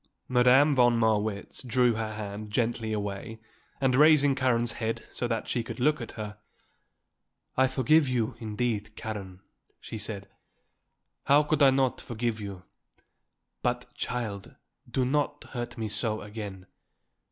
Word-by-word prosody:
Madame 130 +4 +5
von 120 -2 +5
Marwitz 110 -2 0
drew 125 -1 +3
her 110 -1 -3
hand 105 0 -6
gently 115 0 0
away 105 +1 -4 0.4
and 130 -2 +2
raising 145 -1 +6
Karen's 120 -3 +1
head 115 -1 -3
so 120 - -2
that 115 -2 -2
she 120 - 0
could 120 - -7
look 150 +2 +2
at 115 - -7
her, 105 -1 -7 1.2
"I 130 0 +4
forgive 135 +3 +3
you, 120 -3 0
indeed, 110 -1 -2
Karen," 100 -4 -6 0.4
she 110 - -7
said. 100 -2 -4 1.0
"How 145 +2 +6
could 150 0 0
I 140 - +8
not 130 -1 +1
forgive 115 -1 -3
you? 100 -3 -7 1.0
But, 125 0 -2
child, 110 -6 -4 0.3
do 130 - +1
not 145 +2 0
hurt 120 -1 -5
me 110 -1 -2
so 110 +1 -2
again. 105 -3 -7
115 Hz, 140 wpm, -28 LUFS, 105-130 Hz, 1.2 s, I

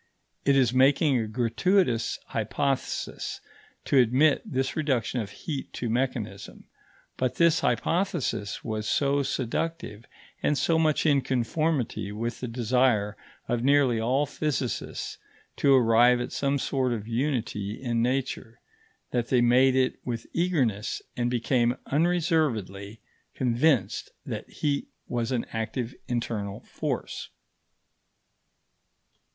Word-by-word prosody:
It 140 - +4
is 125 -3 +3
making 135 +1 +4
a 110 - -2
gratuitous 120 - +1
hypothesis 125 +5 -2 0.5
to 140 - +4
admit 130 +5 +4
this 130 0 -2
reduction 130 -6 0
of 105 - -6
heat 140 +6 -6
to 120 -2 -3
mechanism; 115 -5 -3 0.5
but 130 -1 0
this 170 -1 +4
hypothesis 130 - -1
was 110 -2 -3
so 140 0 +2
seductive, 135 -2 -3 0.4
and 150 - +1
so 165 +2 +2
much 155 -1 +2
in 145 -3 +4
conformity 130 - -1
with 115 +3 -4
the 125 - -4
desire 115 -3 +1 0.3
of 120 -1 -1
nearly 135 -4 +4
all 130 +6 +1
physicists 145 -3 -3 0.4
to 140 -1 +5
arrive 120 0 +5
at 120 - -4
some 140 0 0
sort 130 -2 0
of 110 -2 -5
unity 115 -5 -2
in 120 -3 -1
nature, 125 -2 -2 0.5
that 120 -1 0
they 125 - +3
made 125 +2 +5
it 130 -1 +1
with 115 -2 -4
eagerness 135 - 0
and 120 0 0
became 120 0 +1
unreservedly 145 - 0 0.4
convinced 125 -4 +1 0.2
that - - -5
heat 145 -1 -1 0.2
was 120 0 -2
an 120 -3 0
active 115 +2 -3
internal 115 -4 -3
force. - - -4
125 Hz, 120 wpm, -27 LUFS, 115-140 Hz, 0.5 s, to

